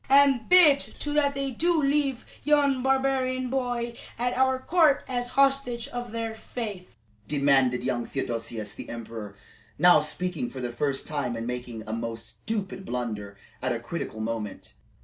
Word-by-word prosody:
"And 275 -4 +5
bid, 335 -6 +8
too, 295 +1 -5
that 285 -2 +3
they 275 -1 -2
do 335 +6 +2
leave 275 -3 +1 0.2
yon 285 -3 +3
barbarian 260 -1 +1
boy 245 -3 -1 0.2
at 245 +1 0
our 260 0 +3
court 310 +1 +3
as 245 -2 -1
hostage 270 -3 +2
of 245 -3 -5
their 225 -1 -3
faith," 215 -4 -6 0.4
demanded 135 -4 +3
young 125 -2 -1
Theodosius 115 -5 -4
the - - -8
emperor, 110 -3 -7 0.4
now 175 -2 +7
speaking 155 -2 -3
for 130 - -8
the 120 -1 -3
first 135 +2 -1
time 145 -6 -2
and 115 0 -4
making 125 -2 -5
a 110 - -4
most 115 0 -4
stupid 200 -3 -4
blunder 110 - -4 0.2
at 130 -1 0
a 115 - -3
critical 120 -3 -5
moment. 110 -2 -4
220 Hz, 155 wpm, -27 LUFS, -, 0.4 s, bid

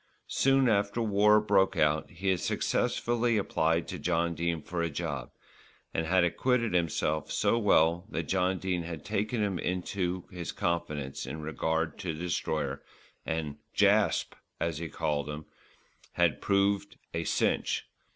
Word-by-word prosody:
Soon 135 -1 +3
after 100 0 +1
war 105 -1 +5
broke 100 -2 +2
out 75 0 +2
he 95 +3 -3
had 95 -2 +2
successfully 120 +4 +1
applied 80 -4 +1
to - - -5
John 85 -1 +1
Dene 85 0 -2
for 85 -1 -3
a 85 - 0
job, 70 - -4 0.6
and 80 0 -1
had 90 +1 +4
acquitted 115 +5 +1
himself 80 -3 0
so 115 - +2
well 85 -3 +3
that 85 - -2
John 95 +2 +1
Dene 90 -2 -1
had 85 -3 -7
taken 105 +2 -1
him 95 -4 -1
into 90 0 -2
his 90 -2 -5
confidence 75 -7 -2
in 80 +4 -5
regard 80 +1 -1
to 85 -5 -3
the - - -9
Destroyer, 75 -5 -2 0.5
and 80 -3 -2 0.2
"Jasp," - - +3 0.3
as 80 -2 -1
he 85 -1 -4
called 75 0 -1
him, 75 +1 -6 0.7
had 85 -3 +2
proved 100 0 +1 0.2
"a 85 - -1
cinch." - - 0
85 Hz, 150 wpm, -30 LUFS, 80-100 Hz, 0.7 s, war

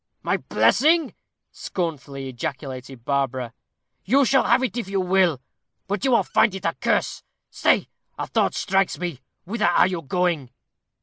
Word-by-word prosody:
"My - - +1
blessing!" 315 0 +3 0.4
scornfully 140 -6 -4
ejaculated 130 -1 -6
Barbara. 130 -4 -1 0.5
"You 270 +7 +3
shall 270 +1 +3
have 250 +2 +3
it 255 - -2
if 240 -6 -3
you 195 0 -1
will, 180 -5 +2 0.5
but 200 +3 -2
you 270 - +2
will 240 - +4
find 205 - +2
it 190 - -7
a - - +1
curse. - - 0 0.3
Stay! - - +2 0.3
a - - -3
thought - - 0
strikes 195 -1 +1
me. 170 -7 -5 0.2
Whither 210 0 0
are 175 - +5
you 180 -3 -2
going?" 165 -3 -1
180 Hz, 150 wpm, -23 LUFS, 135-210 Hz, 0.5 s, are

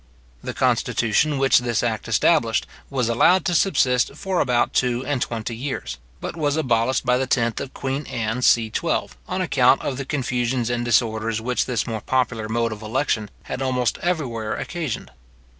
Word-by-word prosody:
The - - -5
constitution 140 +6 +1
which 135 -1 +4
this 120 -3 -1
act 115 -3 -2
established, - - +2 0.2
was 130 -4 0
allowed 170 +10 +4
to 175 - +1
subsist 135 -8 +2
for 190 +2 -2
about 125 -2 +2
two 125 0 +1
and 140 -2 -1
twenty 115 -1 -3
years, 110 - -5 0.2
but - - -5
was 150 -2 0
abolished 130 -3 +1
by 125 0 +3
the 130 - -1
10th 115 -3 +1
of 135 - -7
queen 135 +2 -3
Anne, 115 +1 -2
ch.12, 115 -3 +2 0.2
on - - -2
account - - +3
of 135 - -2
the 140 - -4
confusions 125 -3 -1
and 120 0 -1
disorders 115 -1 +1
which 125 +2 -1
this 120 -6 -1
more 110 -3 -4
popular 120 -4 -1
mode 115 0 0
of 110 0 -7
election 110 -1 -1
had 130 - -5
almost 125 -3 0
everywhere 130 -11 -2
occasioned. 160 - -4
125 Hz, 170 wpm, -22 LUFS, 115-135 Hz, 0.2 s, which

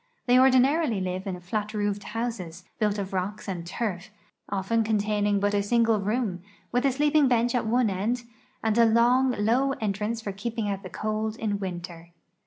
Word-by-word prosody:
The.v 250 0 +5
ordinarily 260 -1 +4
live 185 +1 -3
in 180 -2 -4
flat 210 +4 -3
roofed 205 -1 -1
houses, 210 -7 -4 0.2
built 210 -1 +1
of 195 -1 -4
rocks 190 +4 -3
and 180 -3 -4
turf, 200 0 -3 0.4
often 205 +4 0
contain 210 -1 0
ing 205 -1 +2
but 205 +1 +1
a 205 - +2
single 225 +1 +2
room, 205 -3 -1 0.3
with 245 +3 +2
a - - +3
sleeping 295 +2 +3
bench 240 -1 +2
at 245 -3 0
one 245 +1 +3
end 225 +6 -1 0.4
and 220 -1 +1
a 230 - +7
long, 240 +3 +4
low 245 +6 +2
entrance 215 0 -2
for 215 -3 -4
keeping 220 +2 -3
out 195 -1 -2
the 185 - -8
cold 215 +2 -2
in 210 -3 -2
winter. 175 -3 -7
215 Hz, 185 wpm, -26 LUFS, 195-235 Hz, 0.4 s, a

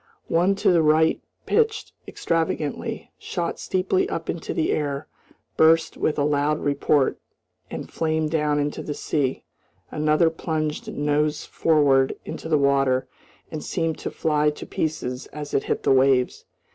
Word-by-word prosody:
One 175 +4 +3
to - - +2
the 170 -2 +4
right 160 +1 +3 0.2
pitched 445 -1 +1 0.2
extravagantly, 160 -3 -2
shot 170 -1 -3
steeply 185 0 0
up 165 -1 -3
into 165 - -6
the 160 - 0
air, 145 -1 -2 0.5
burst 160 +1 +4
with 155 - -1
a 145 - +2
loud 145 +1 +1
report, 140 -1 +1 0.5
and - - -6
flamed 160 -1 -1
down 150 -2 +1
into 145 0 -2
the 150 - -5
sea; 140 -4 -1 0.5
another 155 +2 +2
plunged 155 -2 -3
nose 150 +1 0
forward 140 -4 +3
into 160 - -6
the 155 - +4
water 135 -2 +2 0.4
and 155 - -5
seemed 165 -1 -2
to - - -4
fly 150 -1 +1
to 150 - -7
pieces 130 -5 -3
as 150 0 -8
it - - +1
hit - - -2
the - - +3
waves. 130 -1 +3
150 Hz, 145 wpm, -24 LUFS, 145-160 Hz, 0.5 s, the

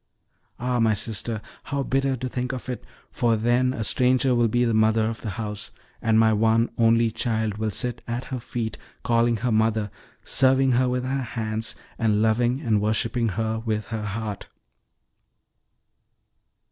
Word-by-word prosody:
Ah, 125 0 0
my 110 -2 +3
sister, 110 +1 -3 0.2
how 140 -1 -2
bitter 135 0 0
to 130 - -3
think 125 +1 -3
of 130 - -6
it! 125 -1 -4 0.3
for 120 -2 +2
then 120 +3 +2
a 115 -3 -3
stranger 130 +3 +3
will 120 -1 +3
be 120 +2 +2
the 115 - +1
mother 110 0 +3
of 115 0 -4
the 110 - -4
house, 105 -2 -4 0.3
and 110 -1 +3
my 110 0 +5
one 115 +2 +2
only 115 0 +3
child 110 -3 -1
will 110 0 0
sit 120 +4 -2
at 120 +1 -3
her 130 - -2
feet, 115 -1 -4 0.2
calling 115 0 +2
her 120 +3 -1
mother, 110 -1 +1 0.3
serving 135 0 +3
her 125 +1 +3
with 125 0 -1
her 135 +1 -1
hands, 110 -2 -3 0.2
and 110 -2 +2
loving 120 +4 +2
and 110 -7 +1
worshiping 115 +3 0
her 110 +2 -2
with 110 -2 -2
her 110 -1 -3
heart!" 105 -1 -5
115 Hz, 165 wpm, -24 LUFS, 110-125 Hz, 0.3 s, my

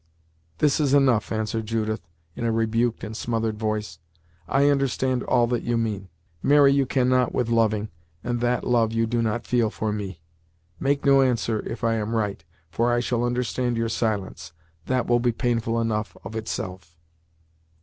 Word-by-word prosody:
"This 150 0 +2
is 145 -2 +3
enough!" 130 -6 +3
answered 110 0 -2
Judith, 110 -1 -1 0.3
in - - -5
a 115 - +1
rebuked 115 +1 0
and 110 +1 -5
smothered 115 -2 -2
voice. 110 -1 -3 0.5
"I 140 +1 +3
understand 130 -2 +1
all 120 - +2
that 120 0 -1
you 120 0 -1
mean. 105 -4 -2 0.3
Marry 145 -1 +5
you 140 -2 +2
cannot 125 -1 +2
with 120 -2 0
loving, 110 -2 +1 0.3
and 120 -1 -1
that 120 0 +1
love 115 -2 +2
you 115 0 +2
do 120 +1 0
not 115 +1 -1
feel 120 -3 +2
for 105 0 -3
me. 100 -5 -5 0.6
Make 140 +1 0
no 135 -1 +6
answer, 115 -4 +1
if 120 - -6
I 115 -1 +2
am 110 +1 -2
right, 105 -6 -2 0.3
for 120 +5 +1
I 120 - +2
shall 120 0 -1
understand 120 0 -1
your 115 0 0
silence. 100 -7 -2 0.3
That 130 -2 +1
will 120 0 +3
be 120 0 +2
painful 115 -1 0
enough 110 -1 -2
of 110 - -8
itself." 90 -6 -5
115 Hz, 170 wpm, -24 LUFS, 110-125 Hz, 0.6 s, no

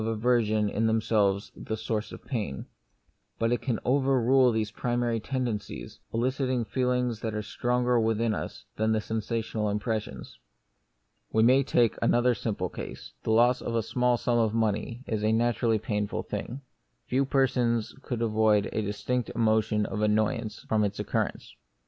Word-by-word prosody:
1 - - -2
1 115 - 0
aversion 110 -2 +2
in 110 +2 0
themselves 105 -3 +1
the 110 - -4
source 110 0 -3
of - - -11
pain; 105 - -3 0.7
but 115 0 +1
it 120 - +1
can 120 -5 -1
overrule 130 -1 +4
these 110 -2 -1
primary 120 0 -1
tendencies, 120 -4 -4
eliciting 130 +1 0
feelings 125 -2 0
which 110 - -2
are 105 - -2
stronger 125 +1 +1
within 110 0 +1
us - - -6
than 110 +1 +2
the 110 - +2
sensational 110 0 -2
impressions. 105 - -4 0.9
We 110 - +3
may 130 +4 +6
take 120 -4 +2
another 120 +1 +3
simple 100 -5 -2
case: - - -8
The - - -5
loss 120 +3 +4
of 115 - -3
a 115 - +1
small 125 +2 +1
sum 120 0 +1
of 110 -1 +1
money 115 +2 -1
is 110 -2 -2
a 110 - +3
naturally 115 0 +2
painful 105 -1 -2
thing; 130 +4 -5 0.4
few 135 +2 +1
persons 125 -4 +1
could 120 -4 -3
avoid 110 -2 +3
a 110 - 0
distinct 110 +4 -2
emotion 110 -2 +2
of 105 - -3
annoyance 110 +1 0
from 110 -1 +2
its 100 0 -2
occurrence. - - -2
115 Hz, 160 wpm, -28 LUFS, 110-125 Hz, 0.9 s, may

